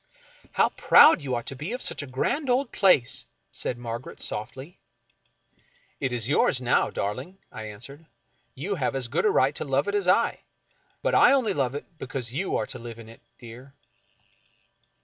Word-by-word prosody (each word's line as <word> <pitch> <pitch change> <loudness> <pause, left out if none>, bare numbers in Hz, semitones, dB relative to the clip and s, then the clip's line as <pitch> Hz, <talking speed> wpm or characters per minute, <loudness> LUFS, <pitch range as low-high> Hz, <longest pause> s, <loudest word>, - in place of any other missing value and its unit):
" - - -27
How - - +3
proud 300 - +6
you 130 -3 -2
ought 120 - -4
to 135 - -5
be 150 - -5
of 250 - -5
such - - -2
a 145 - -7
grand 260 - -1
old 250 +1 +1
place! 180 - +3
" - - -48
said 120 - -2
Margaret, 120 +1 -7
softly. 135 - -5 0.6
" - - -38
It 130 -2 -1
is 120 -2 -1
yours 135 -2 +2
now, 125 -1 +2
darling," 130 - -4
I 110 - -7
answered. 130 +9 -10 0.3
" - - -43
You 200 - -1
have 140 -7 -2
as 130 -3 -2
good 160 - -1
a - - +5
right 135 -7 +3
to - - -3
love 140 +1 0
it 200 - -1
as 200 -3 0
I 195 +6 +3 0.3
— - - -40
but - - +1
I - - +6
only 245 -7 +2
love 135 -4 -1
it 145 - -5
because 125 -3 -3
you 180 +8 -2
are 110 - -1
to - - -9
live 115 -1 -9
in 115 -1 -12
it, 115 - -15 0.2
dear." 125 +3 -13
135 Hz, 205 wpm, -26 LUFS, 120-185 Hz, 0.6 s, proud